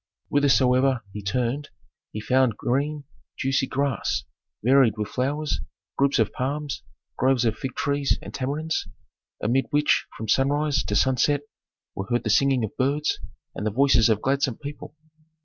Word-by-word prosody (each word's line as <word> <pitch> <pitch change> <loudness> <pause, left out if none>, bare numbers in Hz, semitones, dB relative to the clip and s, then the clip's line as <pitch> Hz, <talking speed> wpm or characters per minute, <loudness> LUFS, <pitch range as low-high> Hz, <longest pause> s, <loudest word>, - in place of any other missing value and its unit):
Whithersoever 130 -2 +3
he 105 - -5
turned 125 +8 -2 0.4
he 105 - -5
found 125 0 +2
green 145 +4 -1 0.3
juicy 135 0 +1
grass 140 +1 -1 0.4
varied 125 -3 +4
with 105 -1 -3
flowers, 145 +4 -1 0.3
groups 140 0 +2
of - - +1
palms, 145 +2 -3 0.4
groves 130 -1 +2
of 110 -2 +1
fig 130 +3 -5
trees 140 -1 0
and - - -10
tamarinds, 150 +4 -2 0.6
amid 125 +5 +1
which 150 0 +2
from 110 - -5
sunrise 145 +5 +2
to - - -2
sunset 135 +2 +2 0.5
were 95 - -5
heard 120 +2 0
the 110 - 0
singing 135 +2 +3
of 110 - -4
birds 140 +3 0 0.3
and - - -5
the 110 - +1
voices 120 0 +4
of 110 -1 +1
gladsome 135 -2 +1
people. 145 +1 -8
135 Hz, 150 wpm, -25 LUFS, 120-140 Hz, 0.6 s, varied